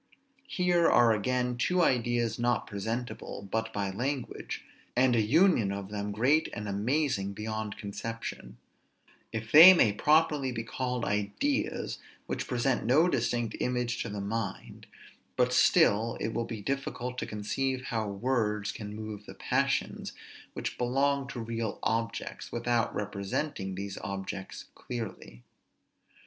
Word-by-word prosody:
Here 175 Hz, -5 st, +3 dB
are 120 Hz, -2 st, +5 dB
again 125 Hz, +3 st, 0 dB
two 180 Hz, +8 st, +2 dB
ideas 120 Hz, -4 st, +1 dB
not 120 Hz, +1 st, +1 dB
presentable 110 Hz, 0 st, -5 dB
but 110 Hz, 0 st, -1 dB
by 100 Hz, -2 st, -2 dB
language, 130 Hz, +5 st, -4 dB, 0.3 s
and 125 Hz, 0 st, +4 dB
an 110 Hz, -2 st, +2 dB
union 155 Hz, -, +4 dB
of 100 Hz, 0 st, -5 dB
them 105 Hz, 0 st, -3 dB
great 130 Hz, +9 st, +2 dB
and 105 Hz, 0 st, -5 dB
amazing 105 Hz, 0 st, 0 dB
beyond 110 Hz, 0 st, -4 dB
conception; 100 Hz, -, -6 dB, 0.7 s
if 110 Hz, +1 st, -5 dB
they 170 Hz, +5 st, +11 dB
may 110 Hz, -11 st, +4 dB
properly 150 Hz, +2 st, +3 dB
be 115 Hz, -2 st, -3 dB
called 125 Hz, +1 st, -2 dB
ideas 105 Hz, -, -1 dB, 0.3 s
which -, -, -3 dB
present 125 Hz, 0 st, 0 dB
no 140 Hz, +9 st, +4 dB
distinct 120 Hz, -5 st, 0 dB
image 125 Hz, -1 st, -1 dB
to 115 Hz, -, -3 dB
the 105 Hz, -1 st, -4 dB
mind; 100 Hz, -1 st, -4 dB, 0.5 s
but -, -, +2 dB
still 110 Hz, +3 st, +4 dB
it 110 Hz, -, -2 dB
will 115 Hz, -, -1 dB
be 110 Hz, -3 st, -6 dB
difficult 125 Hz, -1 st, -3 dB
to -, -, -3 dB
conceive 130 Hz, +5 st, -2 dB
how 110 Hz, -3 st, -1 dB
words 105 Hz, -1 st, 0 dB
can 105 Hz, -1 st, -7 dB
move 110 Hz, -1 st, -7 dB
the -, -, -9 dB
passions -, -, -1 dB, 0.4 s
which -, -, -5 dB
belong 135 Hz, +3 st, +1 dB
to 120 Hz, -, -6 dB
real 115 Hz, -1 st, -3 dB
objects, 115 Hz, -1 st, -2 dB
without 120 Hz, 0 st, 0 dB
representing 100 Hz, +1 st, -3 dB
these 100 Hz, +1 st, -5 dB
objects 95 Hz, 0 st, -6 dB
clearly. 110 Hz, -, -7 dB
115 Hz, 135 wpm, -29 LUFS, 105-125 Hz, 0.7 s, they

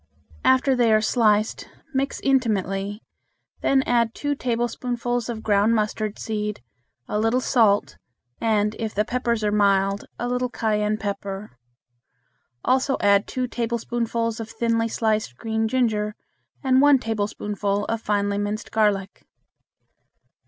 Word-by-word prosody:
After 260 Hz, +1 st, +4 dB
they 240 Hz, -2 st, +3 dB
are 215 Hz, -, +5 dB
sliced 215 Hz, -1 st, +1 dB, 0.2 s
mix 275 Hz, +1 st, -1 dB
intimately, 205 Hz, -5 st, 0 dB, 0.6 s
then 270 Hz, -1 st, +3 dB
add 235 Hz, -2 st, +1 dB
two 290 Hz, 0 st, -1 dB
tablespoonfuls 240 Hz, -1 st, -2 dB
of 225 Hz, -2 st, -5 dB
ground 210 Hz, +2 st, +3 dB
mustard 215 Hz, -1 st, -1 dB
seed, 210 Hz, -, -3 dB, 0.4 s
a 210 Hz, -, -1 dB
little 225 Hz, +3 st, +2 dB
salt, 220 Hz, -6 st, +2 dB, 0.4 s
and, 215 Hz, -1 st, +1 dB
if 220 Hz, -1 st, -3 dB
the 210 Hz, +1 st, +1 dB
peppers 235 Hz, -2 st, -1 dB
are 210 Hz, -, +1 dB
mild, 200 Hz, -1 st, +2 dB
a 240 Hz, -, -3 dB
little 250 Hz, 0 st, -1 dB
cayenne 215 Hz, -2 st, 0 dB
pepper; 200 Hz, -1 st, -5 dB, 1.1 s
also 265 Hz, +1 st, +2 dB
add 200 Hz, 0 st, +3 dB
two 255 Hz, -1 st, -2 dB
tablespoonfuls 230 Hz, -1 st, -2 dB
of 225 Hz, 0 st, -6 dB
thinly 230 Hz, 0 st, 0 dB
sliced 215 Hz, -, -1 dB
green 220 Hz, +2 st, -1 dB
ginger 215 Hz, -4 st, 0 dB, 0.5 s
and 260 Hz, -1 st, +4 dB
one 290 Hz, -1 st, +6 dB
tablespoonful 205 Hz, -3 st, -2 dB
of 225 Hz, -1 st, -2 dB
finely 205 Hz, -1 st, 0 dB
minced 210 Hz, +1 st, -3 dB
garlic. 205 Hz, -3 st, 0 dB
220 Hz, 125 wpm, -23 LUFS, 210-240 Hz, 1.1 s, one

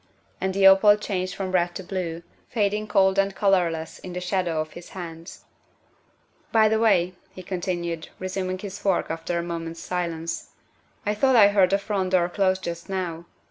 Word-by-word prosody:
And 190 Hz, 0 st, -1 dB
the 195 Hz, 0 st, +3 dB
opal 195 Hz, +2 st, +7 dB
changed 185 Hz, -3 st, -3 dB
from 190 Hz, -2 st, -3 dB
red 175 Hz, -1 st, +1 dB
to 190 Hz, -, -5 dB
blue, 175 Hz, -3 st, -4 dB, 0.3 s
fading 210 Hz, -2 st, 0 dB
cold 190 Hz, -1 st, +3 dB
and 195 Hz, 0 st, +1 dB
colorless 175 Hz, -6 st, +1 dB
in 180 Hz, -, -8 dB
the 180 Hz, -, -3 dB
shadow 180 Hz, -3 st, -1 dB
of 155 Hz, 0 st, -3 dB
his 175 Hz, 0 st, -11 dB
hands. 165 Hz, -2 st, -9 dB, 0.4 s
' -, -, -38 dB
' -, -, -38 dB
By 220 Hz, -1 st, +5 dB
the 220 Hz, 0 st, +2 dB
way, 185 Hz, -5 st, +3 dB
' -, -, -35 dB
' -, -, -37 dB
he 185 Hz, -, -8 dB
continued, 175 Hz, -3 st, -3 dB
resuming 185 Hz, 0 st, -3 dB
his 200 Hz, +1 st, -7 dB
fork 195 Hz, -5 st, 0 dB
after 165 Hz, +1 st, -3 dB
a 170 Hz, -, -1 dB
moment's 165 Hz, -1 st, -5 dB
silence, 170 Hz, -2 st, -4 dB, 0.2 s
" -, -, -37 dB
I 210 Hz, -, +1 dB
thought 260 Hz, +5 st, +3 dB
I 205 Hz, -3 st, +8 dB
heard 195 Hz, -3 st, +4 dB
the 195 Hz, -, +3 dB
front 195 Hz, -2 st, -2 dB
door 175 Hz, -1 st, +3 dB
close 190 Hz, 0 st, +1 dB
just 170 Hz, 0 st, -6 dB
now. 175 Hz, -3 st, -3 dB
185 Hz, 200 wpm, -25 LUFS, 170-195 Hz, 0.4 s, I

